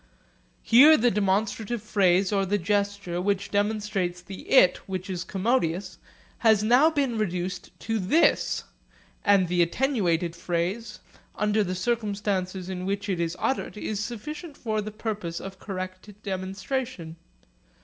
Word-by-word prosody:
Here 290 Hz, +7 st, +8 dB
the 240 Hz, +1 st, +3 dB
demonstrative 210 Hz, +3 st, 0 dB
phrase 195 Hz, -2 st, +2 dB
or 195 Hz, -1 st, +2 dB
the 200 Hz, +2 st, +1 dB
gesture, 200 Hz, -1 st, -1 dB
which 200 Hz, 0 st, -1 dB
demonstrates 205 Hz, -4 st, -1 dB
the 185 Hz, +2 st, -10 dB
'it' 185 Hz, -9 st, +6 dB
which 190 Hz, 0 st, -4 dB
is 175 Hz, -2 st, -3 dB
commodious, 190 Hz, -3 st, -1 dB, 0.4 s
has 220 Hz, -3 st, +4 dB
now 250 Hz, +8 st, +5 dB
been 275 Hz, -7 st, -1 dB
reduced 180 Hz, -2 st, -3 dB
to 225 Hz, -1 st, -1 dB
'this'; 215 Hz, -, +2 dB, 0.6 s
and 200 Hz, -3 st, +4 dB
the 175 Hz, +1 st, +2 dB
attenuated 175 Hz, -, +1 dB
phrase, 185 Hz, +6 st, -3 dB, 0.3 s
under 210 Hz, 0 st, +1 dB
the 185 Hz, -1 st, -3 dB
circumstances 200 Hz, -3 st, -2 dB
in 185 Hz, 0 st, -4 dB
which 200 Hz, +1 st, -2 dB
it 185 Hz, -3 st, -1 dB
is 170 Hz, 0 st, -2 dB
uttered, 265 Hz, -4 st, -2 dB
is 210 Hz, -1 st, -3 dB
sufficient 290 Hz, +8 st, -6 dB
for 215 Hz, -2 st, -2 dB
the 210 Hz, -, -5 dB
purpose 210 Hz, -6 st, -4 dB
of 195 Hz, 0 st, -9 dB
correct 185 Hz, 0 st, -6 dB
demonstration. 190 Hz, -1 st, -4 dB
200 Hz, 135 wpm, -26 LUFS, 185-220 Hz, 0.6 s, Here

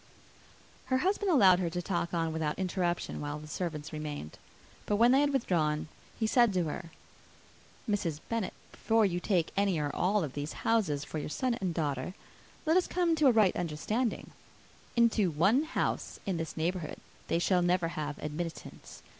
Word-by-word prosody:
Her 260 Hz, -, +1 dB
husband 390 Hz, +6 st, +1 dB
allowed 195 Hz, -, +6 dB
her 175 Hz, -2 st, 0 dB
to 175 Hz, +2 st, -3 dB
talk 175 Hz, -1 st, -2 dB
on 165 Hz, -2 st, -1 dB
without 155 Hz, -2 st, -1 dB
interruption 180 Hz, -3 st, -1 dB
while 145 Hz, 0 st, -3 dB
the 150 Hz, -, -10 dB
servants 155 Hz, -2 st, -4 dB
remained. 150 Hz, -, -6 dB, 0.5 s
But 210 Hz, -, +2 dB
when 235 Hz, +3 st, +5 dB
they 270 Hz, +2 st, +5 dB
had 290 Hz, 0 st, +2 dB
withdrawn, 160 Hz, -, 0 dB, 0.3 s
he 225 Hz, -, +1 dB
said 240 Hz, 0 st, +4 dB
to 180 Hz, -, +2 dB
her, 160 Hz, +1 st, -5 dB, 1.0 s
"Mrs. 180 Hz, -8 st, -1 dB
Bennet, 230 Hz, -4 st, -2 dB, 0.2 s
before 225 Hz, -1 st, +2 dB
you 175 Hz, -2 st, 0 dB
take 180 Hz, -3 st, +1 dB
any, 195 Hz, -3 st, +2 dB
or 145 Hz, -2 st, -2 dB
all 200 Hz, +2 st, +2 dB
of 140 Hz, -4 st, -4 dB
these 145 Hz, +1 st, -4 dB
houses, 185 Hz, -11 st, +2 dB
for 155 Hz, -, -4 dB
your -, -, -4 dB
son 255 Hz, -, 0 dB
and 185 Hz, -2 st, 0 dB
daughter, 150 Hz, 0 st, -2 dB, 0.5 s
let 320 Hz, +3 st, +4 dB
us 370 Hz, -, +2 dB
come 350 Hz, -2 st, +1 dB
to 300 Hz, -2 st, +5 dB
a -, -, +7 dB
right 215 Hz, -5 st, +4 dB
understanding. 195 Hz, +9 st, -2 dB, 0.6 s
Into 230 Hz, -5 st, +3 dB
one 195 Hz, -, +3 dB
house 315 Hz, -, -2 dB
in 190 Hz, -3 st, -1 dB
this 165 Hz, 0 st, -5 dB
neighbourhood 165 Hz, -1 st, -2 dB, 0.3 s
they -, -, +1 dB
shall 180 Hz, +1 st, +2 dB
never 175 Hz, -1 st, +2 dB
have 150 Hz, -2 st, -4 dB
admittance. 160 Hz, +2 st, -6 dB
180 Hz, 175 wpm, -31 LUFS, 155-220 Hz, 1.0 s, a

